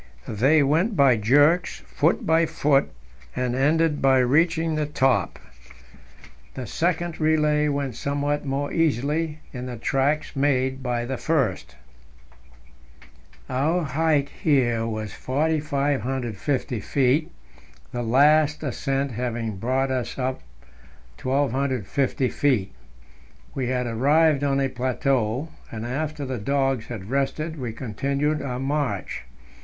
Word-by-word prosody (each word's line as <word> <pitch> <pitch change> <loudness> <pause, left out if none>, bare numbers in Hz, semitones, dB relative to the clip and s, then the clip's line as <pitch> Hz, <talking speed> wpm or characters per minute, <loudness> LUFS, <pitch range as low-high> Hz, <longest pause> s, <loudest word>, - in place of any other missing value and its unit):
They 135 +8 +3
went 165 +10 +1
by 135 -5 +5
jerks, 145 +11 +3
foot 160 +4 0
by 165 +1 +3
foot, 145 -3 +2 0.5
and 125 -1 -1
ended 150 +3 +2
by 135 -1 +5
reaching 160 +6 +2
the 155 -1 -1
top. 130 - +1 1.2
The 130 - -5
second 170 +3 -1
relay 150 -1 +2
went 140 -3 -1
somewhat 145 +2 -1
more 140 0 -2
easily 155 +1 0
in 125 -1 -5
the 125 -1 -6
tracks 140 +7 0
made 130 -1 +1
by 120 -2 -2
the 130 +1 -3
first. 95 - -1 1.7
Our 155 +7 0
height 150 -1 +1
here 120 -7 +2
was 110 -2 -4
4,550 135 -4 -1
feet, 140 - +1 0.6
the 120 - -3
last 145 +5 +3
ascent 135 0 -1
having 115 -3 -3
brought 130 +5 0
us 130 -2 -3
up 130 0 -2 0.8
1,250 130 -1 0
feet; 115 -10 0 0.8
we 130 -2 -2
had 125 0 -1
arrived 145 +5 +3
on 140 -1 +1
a 135 - +2
plateau, 130 +1 -1 0.2
and 110 0 -6
after 145 +3 -3
the 130 -2 -4
dogs 135 0 0
had 110 -2 -7
rested 155 +3 -1
we 125 -3 -3
continued 140 +7 -2
our 125 -2 -4
march. 135 - -2
135 Hz, 115 wpm, -24 LUFS, 125-150 Hz, 1.7 s, by